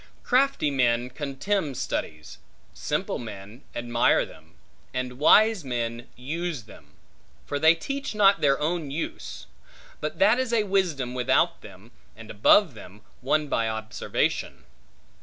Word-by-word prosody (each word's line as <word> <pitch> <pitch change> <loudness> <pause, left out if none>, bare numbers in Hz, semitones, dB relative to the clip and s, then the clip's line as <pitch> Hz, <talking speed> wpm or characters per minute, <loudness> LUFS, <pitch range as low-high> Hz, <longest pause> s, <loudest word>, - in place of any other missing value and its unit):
Crafty 265 - +2
men 125 -2 +1
contemn 145 +4 -2
studies, 75 -8 -5 0.3
simple - - -3
men 105 +1 -9
admire 120 0 +2
them, - - -17 0.4
and 125 0 -4
wise 215 +5 +5
men 120 -1 -4
use 155 +1 -4
them; 110 - -17 0.5
for 145 - -3
they 160 +3 +6
teach 275 +7 -5
not 200 -1 +4
their 140 -2 +3
own 155 -1 -2
use; 150 +4 -6 0.5
but - - -4
that 255 -4 +4
is 260 -2 -1
a 220 -2 +3
wisdom 175 -11 0
without 125 -1 +1
them, 100 +2 -14 0.2
and 110 -1 -11
above 145 - +4
them, 105 -1 -13 0.2
won 150 +3 +1
by 115 -4 0
observation. 110 0 -2
135 Hz, 130 wpm, -25 LUFS, 120-175 Hz, 0.5 s, they